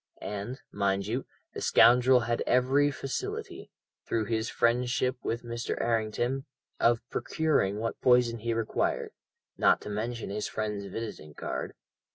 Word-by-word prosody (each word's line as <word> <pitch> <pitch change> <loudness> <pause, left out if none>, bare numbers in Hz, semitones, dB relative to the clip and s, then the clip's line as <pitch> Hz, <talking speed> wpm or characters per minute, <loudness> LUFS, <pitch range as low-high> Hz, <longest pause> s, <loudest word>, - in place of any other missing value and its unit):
And, 105 +6 -5
mind 100 -1 0
you, 120 +5 -3 0.3
the - - -6
scoundrel 125 +1 +6
had 120 +1 -1
every 135 +3 +4
facility, 135 -1 -5 0.4
through 110 -2 0
his 110 +1 -1
friendship 125 +2 +1
with 115 +1 -2
Mr. 120 0 -3
Errington, 120 +4 0 0.3
of 115 0 +2
procuring 140 -7 +1
what 115 +1 -3
poison 125 -2 +4
he 115 +1 -1
required, 115 -1 -1 0.5
not - - +5
to 105 - -6
mention 115 +1 -3
his 105 +1 -2
friend's 105 -2 -3
visiting 95 -8 -7
card. - - -4
115 Hz, 135 wpm, -29 LUFS, 110-125 Hz, 0.5 s, scoundrel